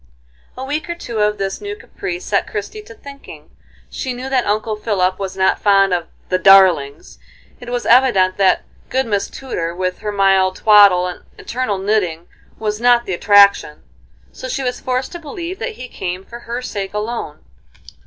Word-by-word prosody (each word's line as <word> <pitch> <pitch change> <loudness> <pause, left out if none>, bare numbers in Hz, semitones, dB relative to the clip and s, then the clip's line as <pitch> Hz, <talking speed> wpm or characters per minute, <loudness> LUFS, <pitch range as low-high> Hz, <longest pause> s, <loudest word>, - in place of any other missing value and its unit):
A 260 - -5
week 305 +4 -4
or 340 - -2
two 235 -9 -6
of 210 0 +1
this 195 0 -4
new 410 0 -5
caprice 370 -3 -7
set - - 0
Christie 430 - -6
to 440 +2 -14
thinking. 280 -8 -13 0.4
She 260 - -5
knew 255 +2 -6
that 255 -4 0
Uncle 215 +1 -1
Philip 190 -4 -1
was 190 -1 -5
not 190 0 +2
fond 195 -2 +3
of 175 -2 -2 0.2
"the 185 - +1
darlings;" 180 -7 +4 0.4
it 245 - -10
was 245 0 -3
evident 230 -7 +4
that 190 -2 +3 0.3
good 265 +1 0
Miss 205 -3 -1
Tudor, 170 -11 -5
with 185 0 -3
her 210 - -4
mild 195 -2 +2
twaddle 200 -4 +5
and 180 -1 -6
eternal 235 -5 -3
knitting, 190 -4 -1 0.3
was 210 0 -3
not 240 -1 +4
the 190 - -3
attraction, 200 -5 +4 0.5
so - - -8
she 275 - -3
was 250 -1 -2
forced 255 0 -2
to 345 - -7
believe 335 +4 -7
that 485 - -4
he 255 -11 -9
came 185 -3 -6
for 235 - -10
her 240 +1 -6
sake 200 -4 -5
alone. 210 - -5
210 Hz, 180 wpm, -18 LUFS, 190-255 Hz, 0.5 s, twaddle